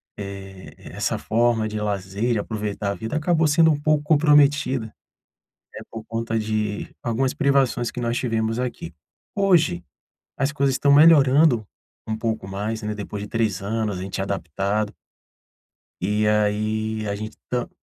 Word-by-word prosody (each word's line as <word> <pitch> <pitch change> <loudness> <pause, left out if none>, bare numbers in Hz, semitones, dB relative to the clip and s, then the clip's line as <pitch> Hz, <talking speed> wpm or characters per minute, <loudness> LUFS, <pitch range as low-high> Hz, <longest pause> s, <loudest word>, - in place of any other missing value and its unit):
eh, 95 -1 -9
essa - - -3
forma 115 -1 +1
de 105 0 -4
lazer, 100 +3 -1
de - - 0
aproveitar 105 -1 -3
a - - -2
vida, 110 - -5
acabou 160 0 +2
sendo 160 +1 +5
um 145 - 0
pouco 150 -1 +2
comprometida, 145 -5 +3 0.9
né, - - -8
por 110 -1 -8
conta 115 0 -3
de 110 -1 -2
algumas 130 +3 0
privações 135 -4 +1
que 125 - -5
nós 120 0 -1
tivemos 115 -1 -1
aqui. 120 -9 -4 0.4
Hoje, 165 - +2 0.5
as 135 +1 0
coisas 140 -3 +1
estão 140 - +2
melhorando 145 -6 +5 0.4
um 110 - -1
pouco 110 -3 -3
mais, 105 +3 -3
né, 105 0 -3
depois 105 0 -6
de 105 - -6
3 110 -6 -1
anos, 105 -1 -2
a - - -5
gente 95 0 -4
adaptado 100 +3 -2 1.1
e 105 +3 +1
aí 110 +1 0
a 100 - -2
gente 110 +1 -7
tam 125 -1 -1
110 Hz, 150 wpm, -23 LUFS, 105-135 Hz, 1.1 s, sendo